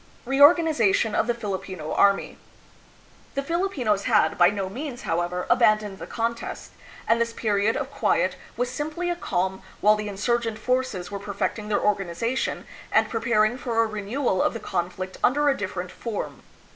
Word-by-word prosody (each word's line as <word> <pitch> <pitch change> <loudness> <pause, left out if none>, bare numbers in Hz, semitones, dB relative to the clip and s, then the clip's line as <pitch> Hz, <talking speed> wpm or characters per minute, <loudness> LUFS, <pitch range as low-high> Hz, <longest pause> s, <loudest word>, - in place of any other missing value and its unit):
Reorganization 275 - +4
of 225 - +1
the 240 - +1
Filipino 190 -7 -5
Army. 200 0 +2 1.0
The 275 - -1
Filipinos 275 - 0
had, 230 -4 +3
by 175 0 +6
no 200 -1 -3
means, 260 +5 -6
however, 175 0 -1
abandoned 215 -4 +3
the - - -7
contest, 230 0 -4 0.4
and 230 +1 +3
this 230 0 0
period 210 -1 +1
of - - -4
quiet - - +1 0.2
was 245 0 -1
simply 310 +6 -3
a - - -1
calm 190 - -2 0.2
while 210 +1 +5
the 210 0 -4
insur 235 +4 0
gent 225 -2 -3
forces 250 -5 -1
were 200 - -4
perfecting 205 +1 -3
their 210 - +1
organization 210 +5 -1 0.3
and - - +3
prepar 225 -2 +2
ing 245 +4 -5
for 230 -2 +1
a - - +1
renewal 215 0 -1
of - - +1
the - - -3
conflict 185 +2 -4
under 290 +3 +4
a 275 - +2
different 185 -4 -4
form. 230 -3 -5
220 Hz, 165 wpm, -25 LUFS, 200-250 Hz, 1.0 s, by